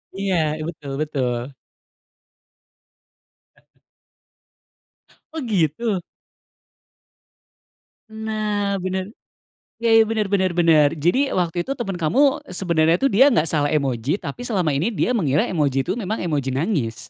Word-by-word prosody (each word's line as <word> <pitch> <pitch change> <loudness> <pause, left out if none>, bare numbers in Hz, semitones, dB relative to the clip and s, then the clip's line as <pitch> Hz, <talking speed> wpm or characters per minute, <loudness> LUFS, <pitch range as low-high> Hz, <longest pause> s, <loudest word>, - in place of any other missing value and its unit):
Iya 195 -1 -1 0.2
ih, 155 - -5
betul 150 -4 -8
betul. 125 -5 -2 2.1
Heeh. - - -33 1.5
Oh 320 - -4
gitu? 200 - 0 2.1
Nah 215 -2 -2
bener. 185 +2 -3 0.7
Ya 230 -1 +2
ya 225 - +8
bener 220 -1 -1
bener 190 -2 +1
bener. 160 -4 +5
Jadi 250 - +2
waktu 175 -1 -1
itu 270 - -9
temen 195 -5 -3
kamu 270 - +2
sebenarnya 170 -2 +1
tuh 275 - +1
dia 265 +8 +6
nggak 165 -9 +2
salah 145 -2 0
emoji, 140 - 0
tapi 245 - -7
selama 185 - 0
ini 170 +12 0
dia 245 +3 0
mengira 150 - +1
emoji 140 -6 0
itu 185 - -1
memang 215 +1 -3
emoji 145 -6 -1
nangis. 135 - -1
180 Hz, 125 wpm, -21 LUFS, 150-220 Hz, 2.1 s, ya